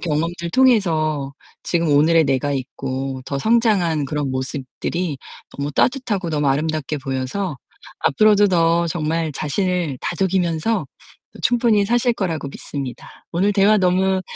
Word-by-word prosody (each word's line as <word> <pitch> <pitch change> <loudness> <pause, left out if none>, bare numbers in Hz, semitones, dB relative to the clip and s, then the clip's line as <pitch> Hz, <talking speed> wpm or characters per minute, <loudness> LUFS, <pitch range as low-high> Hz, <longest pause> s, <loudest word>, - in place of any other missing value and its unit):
경험들 170 +2 -2
통해서 160 - +2 0.3
지금 170 -2 0
오늘의 155 +3 +4
내가 140 +1 0
있고 135 0 -4
더 140 - -3
성장한 205 - +2
그런 145 0 -2
모습들이 135 +5 -3 0.3
너무 140 +1 -4
따뜻하고 215 - 0
너무 150 -2 0
아름답게 150 +1 -1
보여서 135 +6 -3 0.4
앞으로도 210 +6 +4
더 170 -1 +2
정말 160 -1 -1
자신을 165 -1 -1
다독이면서 180 +2 0 0.5
또 - - -13
충분히 230 -4 +3
사실 240 +2 +2
거라고 165 -9 -3
믿습니다. 135 -2 -7 0.2
오늘 195 +5 +2
대화 205 +1 +4
너무 190 0 +2
165 Hz, 310 characters per minute, -20 LUFS, 145-195 Hz, 0.5 s, 오늘의